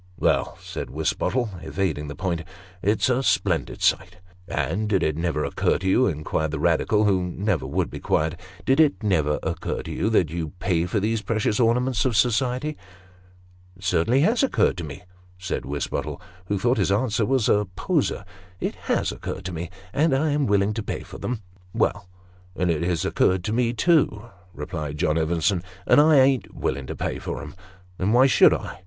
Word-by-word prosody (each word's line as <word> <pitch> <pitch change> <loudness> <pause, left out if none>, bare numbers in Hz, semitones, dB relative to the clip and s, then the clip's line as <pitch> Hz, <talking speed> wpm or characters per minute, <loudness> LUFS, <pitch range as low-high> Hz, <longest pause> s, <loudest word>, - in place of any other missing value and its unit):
"Well," - - +1
said - - -6
Wisbottle, 120 -4 -1
evading 80 -6 -2
the 70 - -6
point, 85 -3 -2 0.4
"it's 105 +3 +2
a 130 0 +2
splendid - - 0
sight." - - +1 0.2
" - - -27
And 85 +10 -1
did 95 -3 +2
it 75 - +1
never 80 -2 -1
occur - - +1
to 95 - -4
you," 125 +7 +4
inquired 80 -1 -1
the 80 - -3
Eadical, 85 +7 +2
who 95 -3 +3
never 90 0 -1
would - - -1
be - - -6
quiet; 80 +2 0
" 100 - -20
did 135 +3 +3
it 150 -6 +3
never 80 -8 +2
occur - - -3
to - - -7
you, 110 - 0
that 90 -8 +2
you 80 -3 -4
pay 85 -3 0
for 105 - 0
these 110 +2 0
precious 105 0 0
ornaments 120 0 +2
of 125 -5 +1
society? 125 +5 +1 0.3
" 90 0 -28
" 90 0 -27
It 95 - -16
certainly 95 +9 +2
has 225 +10 +3
occurred 270 - +2
to 85 - -4
me," 70 -1 -8 0.3
said 90 0 -4
Wisbottle, 70 +1 -3 0.3
who 100 - 0
thought 120 +5 +1
this 95 - +1
answer 110 +2 +1
was 130 +1 +1
a 105 -1 +2
poser; - - 0 0.2
" 90 +1 -26
it - - -2 0.2
lias - - +1
occurred - - -6
to 90 - -4
me, 85 +1 -5 0.2
and 150 -1 +3
I 150 +3 +1
am 145 -1 +1
willing 100 0 +2
to 110 - -3
pay - - -4
for - - -11
them." 120 -4 -4 0.2
" 90 0 -28
Well, 100 -2 0 0.5
and 90 -1 +1
it 80 - -1
has 85 -1 0
occurred 95 -1 +2
to 105 - -2
me 120 0 +1
too," 120 -6 +2 0.2
replied 75 -1 -5
John 80 -1 +1
Evenson, 85 +3 +1
" 90 -1 -23
and - - +6
I 155 +1 +5
ain't 130 -1 +2
willing 65 0 -2
to - - -5
pay - - -3
for - - -5
'em. - - -9 0.5
Then 95 +3 +1
why 125 +2 +6
should 135 - +6
I? - - -7
95 Hz, 205 wpm, -24 LUFS, 85-120 Hz, 0.5 s, and